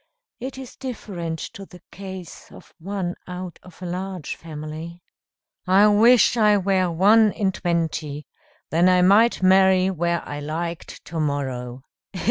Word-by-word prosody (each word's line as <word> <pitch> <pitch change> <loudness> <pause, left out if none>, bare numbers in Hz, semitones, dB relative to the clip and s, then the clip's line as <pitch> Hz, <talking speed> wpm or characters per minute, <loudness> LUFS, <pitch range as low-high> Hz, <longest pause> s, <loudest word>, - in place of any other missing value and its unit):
It 260 +2 -6
is 265 -2 -9
different 185 -10 -5 0.2
to 200 - -9
the 180 - -15
case 190 -3 -10
of - - -15
one 185 0 -3
out 180 -1 -7
of 180 0 -14
a - - -4
large 180 -2 -5
family." 160 +2 -8 0.6
"I 190 +3 +5
wish 230 +3 +5
I 210 -3 +4
were 190 -2 +1
one 205 +6 +4
in 195 -3 0
twenty, 160 -5 -2 0.5
then 170 +3 +4
I 180 -1 +4
might 205 +3 +4
marry 190 0 +4
where 170 -1 -2
I 145 - -5
liked 165 +3 -5
to 165 0 -5
morrow." 130 -4 -3
180 Hz, 140 wpm, -23 LUFS, 165-195 Hz, 0.6 s, I